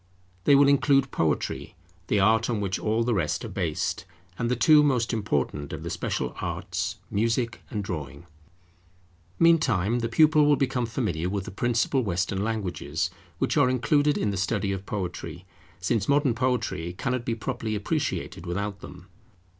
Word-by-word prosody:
They 145 - +6
will 140 0 +6
include 140 -1 +3
Poetry, 80 -2 -1 0.3
the 105 - +2
art 110 +4 +3
on 115 -3 0
which 100 -2 -2
all 110 +2 +1
the 120 0 +1
rest 80 -5 -1
are - - -6
based; - - -2 0.4
and 115 - 0
the 125 - +2
two 150 +4 +6
most 125 -5 +1
important 75 - -1
of - - -6
the - - -4
special - - -2
arts, 90 +1 -3 0.2
music 115 +3 0
and 105 -3 -3
drawing. 75 -4 -6 1.1
Meantime 120 - +3
the 115 -1 -2
pupil 155 +4 +5
will 145 - +5
become 130 -3 0
familiar 95 -8 -2
with 100 -1 -3
the - - -7
principal 120 +5 +1
Western 95 -1 -1
languages, 90 -6 -2 0.3
which - - 0
are 140 -4 +5
included 145 +4 +2
in 105 - 0
the 100 - -3
study 100 +1 0
of 95 0 -5
Poetry, 90 -2 -5 0.3
since 100 +4 0
modern 140 -3 +3
poetry 115 -9 -1
cannot 125 +5 -2
be 115 -1 -1
properly 110 0 -3
appreciated 95 -4 -2
without 100 +3 -3
them. 90 - -11
110 Hz, 160 wpm, -26 LUFS, 95-125 Hz, 1.1 s, They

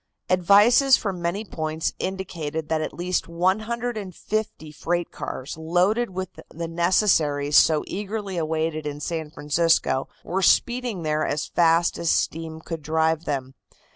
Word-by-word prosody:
Advices 205 +9 +6
from 190 -4 -4
many 180 +6 -2
points 160 -3 -3
indicated 165 -5 -4
that 160 -1 +1
at 155 - -3
least 180 +1 -2
150 210 -1 -2
freight 175 +3 -2
cars 130 +2 -6
loaded 180 +9 +1
with 185 -1 -4 0.2
the 165 +1 -5
necessaries 165 -4 +2
so 155 +1 +5
eagerly 200 0 -4
awaited 160 -1 -1
in 145 0 -5
San 160 +1 -4
Francisco 150 -3 +1 0.2
were 190 +2 -2
speeding 240 0 +2
there 155 0 0
as 145 0 -1
fast 170 0 +3
as 170 - 0
steam 160 0 -1
could 165 -1 -6
drive 160 +1 0
them. 135 -2 -3
170 Hz, 135 wpm, -24 LUFS, 155-190 Hz, 0.2 s, Advices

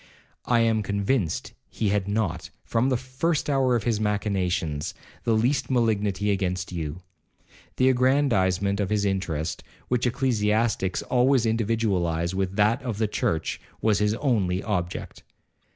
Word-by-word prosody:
I 120 -1 +3
am 110 -1 +2
convinced 100 -1 -1 0.2
he 110 - -1
had 100 -1 0
not, 100 -5 -1 0.2
from 115 +3 +1
the 130 - +2
first 135 +5 -1
hour 130 -3 +3
of 115 - 0
his 115 -2 0
machinations, 95 -7 -1 0.3
the 115 - +3
least 125 +6 +1
malignity 105 -5 +1
against 90 -2 -1
you. 85 0 -5 0.7
The 130 - +3
aggrandizement 110 -8 +2
of 100 -2 0
his 105 -1 +1
interest, 80 -5 -2 0.3
which 125 0 +1
ecclesiastics 110 -5 +1
always 125 -1 +3
individualize 100 -7 0
with 95 0 -2
that 110 +5 +3
of 120 -6 -4
the 110 0 +1
church, 80 -5 -1 0.2
was 110 -2 +2
his 105 +1 +2
only 105 -8 0
object. 90 -4 -3
105 Hz, 135 wpm, -25 LUFS, 95-120 Hz, 0.7 s, I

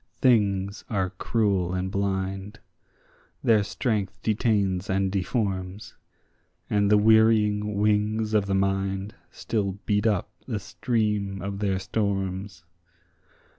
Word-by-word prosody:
Things 100 -5 +2
are 95 -4 -1
cruel 95 -2 0
and 95 +1 -2
blind; 95 0 -2 0.8
their 110 -2 +4
strength 105 -1 -2
detains 100 -4 +1
and 95 0 +1
deforms: 95 -1 -2 0.8
And 100 -1 +3
the 105 - +6
wearying 105 -1 +4
wings 105 +1 +1
of 105 -2 +2
the 95 - 0
mind 95 +1 -1 0.2
still 100 -4 -2
beat 105 +1 +2
up 100 -1 0 0.2
the 110 -5 -2
stream 105 -2 -1
of 100 0 -4
their 100 -2 0
storms. 95 -3 -2
100 Hz, 110 wpm, -26 LUFS, 95-105 Hz, 0.8 s, the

